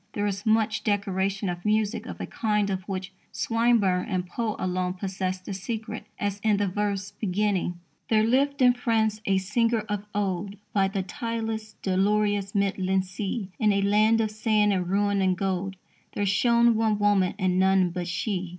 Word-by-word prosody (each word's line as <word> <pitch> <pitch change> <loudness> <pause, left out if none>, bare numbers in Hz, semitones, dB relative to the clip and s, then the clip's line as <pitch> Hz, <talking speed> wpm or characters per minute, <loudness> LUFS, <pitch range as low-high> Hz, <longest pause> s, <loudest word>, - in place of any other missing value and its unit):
There 205 - -1
is 200 +1 -3
much 220 0 +2
decoration 195 -1 0
of 175 -1 -4
music 215 +2 0
of - - -7
a - - -3
kind 210 -2 0
of 190 -1 -2
which 190 -1 -4 0.2
Swinburne 225 -6 +2
and 185 -2 -1
Poe 215 +4 -3
alone 185 0 -1
possessed 185 -1 -3
the 200 - -4
secret, 220 +2 -5
as 205 -1 -2
in 210 0 +2
the 205 0 +1
verse 200 0 -2
beginning: 200 -3 -1 0.3
There 215 -1 +4
lived 275 +4 +2
in 250 0 +7
France 220 -3 0
a 195 -1 +3
singer 225 +4 +1
of 205 -1 -4
old 200 -1 -2 0.2
By 195 -2 +3
the 195 0 -2
tideless, 220 +2 -4
dolorous, 200 +1 +1
midland 190 -1 +1
sea. 195 +1 -4
In 210 -1 +4
a 200 0 +1
land 215 +3 +4
of 215 -1 -1
sand 215 -1 +2
and 180 -2 -1
ruin 200 0 +1
and 185 -1 +2
gold 195 0 -2 0.4
There 205 - 0
shone 235 +4 +4
one 220 -1 +1
woman 205 -2 +2
and 185 -2 +1
none 190 -1 +3
but 175 0 -4
she. 185 0 -2
205 Hz, 175 wpm, -26 LUFS, 190-215 Hz, 0.4 s, in